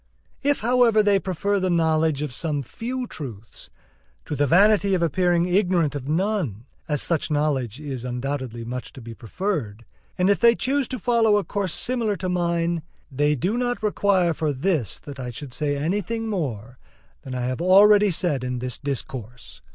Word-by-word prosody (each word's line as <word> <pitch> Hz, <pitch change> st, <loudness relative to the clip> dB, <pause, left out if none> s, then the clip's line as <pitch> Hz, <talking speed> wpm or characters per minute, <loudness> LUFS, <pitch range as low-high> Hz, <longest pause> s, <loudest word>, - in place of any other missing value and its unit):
If, 285 Hz, 0 st, +1 dB
however, 235 Hz, -2 st, +4 dB
they 205 Hz, -1 st, +3 dB
prefer 195 Hz, +2 st, -1 dB
the 185 Hz, 0 st, 0 dB
knowledge 160 Hz, -3 st, +1 dB
of 145 Hz, -4 st, -4 dB
some 145 Hz, 0 st, -2 dB
few 250 Hz, -, -5 dB
truths 115 Hz, -, -9 dB, 0.6 s
to -, -, -4 dB
the 145 Hz, 0 st, +1 dB
vanity 200 Hz, +4 st, +4 dB
of 175 Hz, -, 0 dB
appearing 175 Hz, +1 st, +2 dB
ignorant 180 Hz, -4 st, +2 dB
of 140 Hz, -2 st, -6 dB
none, 165 Hz, -, -1 dB, 0.2 s
as 150 Hz, -3 st, +1 dB
such 165 Hz, -3 st, 0 dB
knowledge 145 Hz, -5 st, -1 dB
is 135 Hz, -5 st, -6 dB
undoubtedly 125 Hz, -2 st, -4 dB
much 125 Hz, +1 st, -6 dB
to -, -, -11 dB
be 115 Hz, 0 st, -9 dB
preferred, 115 Hz, -, -4 dB, 0.3 s
and, 180 Hz, -, +2 dB
if 200 Hz, -, +3 dB
they 235 Hz, 0 st, +5 dB
choose 270 Hz, +1 st, 0 dB
to 255 Hz, -, -4 dB
follow 230 Hz, -4 st, +3 dB
a 205 Hz, -, 0 dB
course 200 Hz, -3 st, -2 dB
similar 235 Hz, -4 st, 0 dB
to 185 Hz, +1 st, -3 dB
mine, 170 Hz, -1 st, 0 dB, 0.3 s
they 145 Hz, +2 st, +1 dB
do 195 Hz, -, -1 dB
not 245 Hz, -2 st, -2 dB
require 200 Hz, -4 st, +2 dB
for 155 Hz, -1 st, -1 dB
this 145 Hz, -, -1 dB
that 140 Hz, -2 st, -10 dB
I 125 Hz, -1 st, -4 dB
should 125 Hz, +2 st, -8 dB
say 145 Hz, 0 st, -1 dB
anything 205 Hz, +9 st, -2 dB
more 130 Hz, -, -4 dB, 0.4 s
than 130 Hz, -1 st, -7 dB
I 125 Hz, -, -2 dB
have 130 Hz, +4 st, -2 dB
already 205 Hz, +3 st, +6 dB
said 165 Hz, -7 st, 0 dB
in 125 Hz, 0 st, -3 dB
this 125 Hz, -1 st, -3 dB
discourse. 125 Hz, -4 st, -6 dB
165 Hz, 175 wpm, -23 LUFS, 130-200 Hz, 0.6 s, already